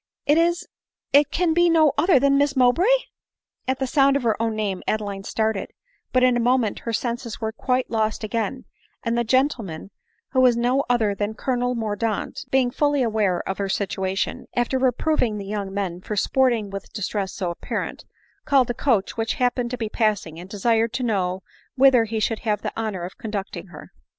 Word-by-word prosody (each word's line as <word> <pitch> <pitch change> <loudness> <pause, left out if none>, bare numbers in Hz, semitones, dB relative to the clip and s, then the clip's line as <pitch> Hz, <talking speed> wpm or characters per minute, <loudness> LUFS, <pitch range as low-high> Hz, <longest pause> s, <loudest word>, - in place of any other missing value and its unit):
it 295 - +4
is— 345 +2 +1 0.5
it 285 0 +6
can 345 0 +1
be 345 +1 +4
no 315 -3 +5
other 335 +2 +4
than 275 +1 +3
Miss 285 0 +2
Mowbray." 260 - +4 0.8
At 260 0 0
the 265 - -1
sound 275 +1 +3
of 280 - 0
her 225 -2 +2
own 225 -1 0
name 200 -4 -2
Adeline 205 -2 -2
started; 220 -1 -1 0.4
but 255 0 +3
in 255 -1 +4
a - - +1
moment 240 -2 +1
her 230 - -4
senses 235 0 -3
were 220 -1 -2
quite 255 +2 -1
lost 220 -1 0
again; 230 +4 -2 0.4
and 230 -1 0
the 235 - +1
gen 260 +4 +4
tleman, 195 - -7 0.4
who 260 - +3
was 250 -2 +5
no 250 +3 +2
other 225 -4 +2
than 205 +2 -3
Colonel 245 0 -1
Mordaunt, 220 -1 -2
being 260 -2 +2
fully 290 0 +1
aware 210 -6 0
of 190 - -3
her 200 -1 -1
situation, 190 0 -2
after 245 +2 +1
reproving 255 -2 +1
the 200 - -6
young 200 -1 -4
men 190 -3 -3
for 210 - -4
sporting 235 -2 +1
with 195 -1 -7
distress 205 -2 -2
so 180 -3 -3
apparent, 170 - -5 0.4
called 265 -4 +3
a - - -2
coach 235 -6 0
which 225 0 -1
happened 245 -1 0
to 250 - -4
be 225 -3 -2
passing, 210 -8 -1
and 180 +2 -10
desired 225 +3 +1
to 255 - -2
know 190 -5 -1 0.3
whither 260 -3 +5
he 220 0 -3
should 220 +1 0
have 210 -3 -1
the - - -3
honor 215 -5 -3
of 180 - -8
conducting 195 -4 -5
her. 150 - -12
230 Hz, 195 wpm, -23 LUFS, 205-255 Hz, 0.8 s, it